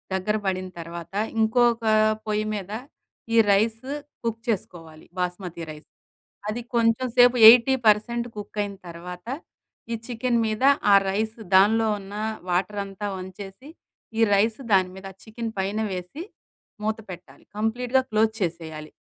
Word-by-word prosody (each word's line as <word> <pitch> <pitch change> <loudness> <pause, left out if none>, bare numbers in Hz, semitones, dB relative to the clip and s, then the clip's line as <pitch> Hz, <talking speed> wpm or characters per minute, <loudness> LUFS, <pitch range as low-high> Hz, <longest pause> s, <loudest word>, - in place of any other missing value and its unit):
దగ్గర 190 +3 0
పడిన 185 0 -1
తర్వాత, 170 +1 -9 0.3
ఇంకొక 235 +1 +3 0.4
పొయ్యి 215 0 0
మీద, 200 -1 -6 0.6
ఈ - - +5
రైస్ 220 +3 +2 0.4
కుక్ 230 -1 -2
చేసుకోవాలి. 165 -7 -4
బాస్మతి 180 -1 -4
రైస్ 150 0 -13 0.6
అది 225 +3 -3
కొంచెం 230 +2 +2
సేపు 245 0 +6
80% 235 -1 +4
కుక్ 210 0 -9
అయిన 200 -1 -6
తర్వాత, 175 +3 -9 0.7
ఈ - - 0
చికెన్ 240 0 0
మీద 215 +2 -2 0.3
ఆ - - +9
రైస్ 220 +3 -2 0.2
దానిలో 220 +4 +5
ఉన్న 200 +1 -10 0.3
వాటర్ 190 +3 0
అంతా 195 +1 -6
వంచేసి, 195 +7 -9 0.5
ఈ - - +3
రైస్ 215 +4 +2
దాని 185 -1 +3
మీద 195 0 -8 0.2
చికెన్ 225 0 -6
పైన 195 +3 -1
వేసి, 185 - -6 0.6
మూత 220 0 0
పెట్టాలి. 175 0 -12
కంప్లీట్‌గా 245 +4 +1
క్లోజ్ 220 +1 +2
చేసేయాలి. 160 -3 -4
210 Hz, 130 wpm, -24 LUFS, 185-230 Hz, 0.7 s, ఆ